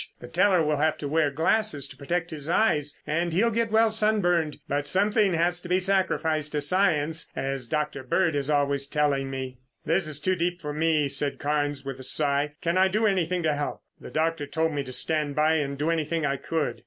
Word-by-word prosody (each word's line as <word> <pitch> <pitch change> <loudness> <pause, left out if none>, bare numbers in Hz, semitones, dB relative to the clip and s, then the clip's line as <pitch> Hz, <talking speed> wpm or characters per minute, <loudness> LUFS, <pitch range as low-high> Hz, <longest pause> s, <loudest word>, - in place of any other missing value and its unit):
The - - -10
teller 190 -5 +3
will 150 -1 0
have 155 +1 +1
to 145 - -5
wear 155 0 +1
glasses 160 +1 +1
to - - -11
protect 165 +5 -3
his 150 -1 -5
eyes 150 -7 +1
and 170 +3 -1
he'll 215 +8 +2
get 230 +1 0
well 220 +1 +3
sunburned, 185 -8 +1
but 145 +1 -2
something 205 0 +2
has 175 +1 +1
to 175 - -10
be 180 +1 +3
sacrificed 170 -5 +1
to 150 - 0
science, 160 -1 +2
as 135 -2 -3
Dr. 150 0 -2
Bird 160 +5 0
is 140 0 -1
always 140 -1 +1
telling 140 -2 0
me." 130 -1 -6 0.3
"It's 160 -3 +1
too 185 +5 0
deep 175 +1 -2
for 150 -3 -5
me," 155 -1 +1
said 140 +1 +1
Carnes 145 -1 -2
with 135 -1 -6
a - - -8
sigh. 145 +2 +2
"Can 170 +2 +1
I 190 - +5
do 215 +4 0
anything 180 -3 0
to 155 -1 +1
help? 145 0 -4 0.2
The - - -10
doctor 160 -2 -1
told 160 +3 -1
me 145 - -1
to 130 - -7
stand 150 +1 0
by 155 +1 +3
and 140 -2 -3
do 150 +4 0
anything 160 0 -1
I 140 -1 0
could." 160 +3 -3
155 Hz, 210 wpm, -26 LUFS, 145-175 Hz, 0.3 s, I